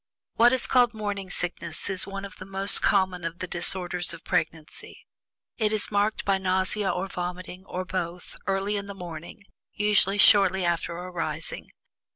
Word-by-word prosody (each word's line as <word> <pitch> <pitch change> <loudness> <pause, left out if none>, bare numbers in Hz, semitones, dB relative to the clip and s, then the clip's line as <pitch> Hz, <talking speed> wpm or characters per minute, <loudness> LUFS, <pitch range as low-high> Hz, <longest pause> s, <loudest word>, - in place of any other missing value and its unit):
What 240 +1 +5
is 260 -1 +3
called 245 -3 +3
"morning 205 -3 -4
sickness" 170 -2 -3
is 190 -2 -4
one 195 0 -5
of 195 - -11
the 185 - -9
most 195 +1 +4
common 190 -3 +2
of 165 0 -4
the 185 - -4
disorders 175 0 0
of 165 - -15
pregnancy. 160 -1 -3 0.5
It 215 -2 +2
is 215 -1 -2
marked 205 +1 0
by 195 -1 +2
nausea 190 +2 +1
or 190 +2 -1
vomiting, 180 +1 -6
or 185 0 -4
both, 180 -1 -5
early 195 +1 0
in 200 0 -5
the 200 - -7
morning, 175 +3 -9 0.3
usually 205 -1 +2
shortly 190 -3 +6
after 170 0 -1
arising. 180 -1 -4
190 Hz, 165 wpm, -26 LUFS, 180-200 Hz, 0.5 s, shortly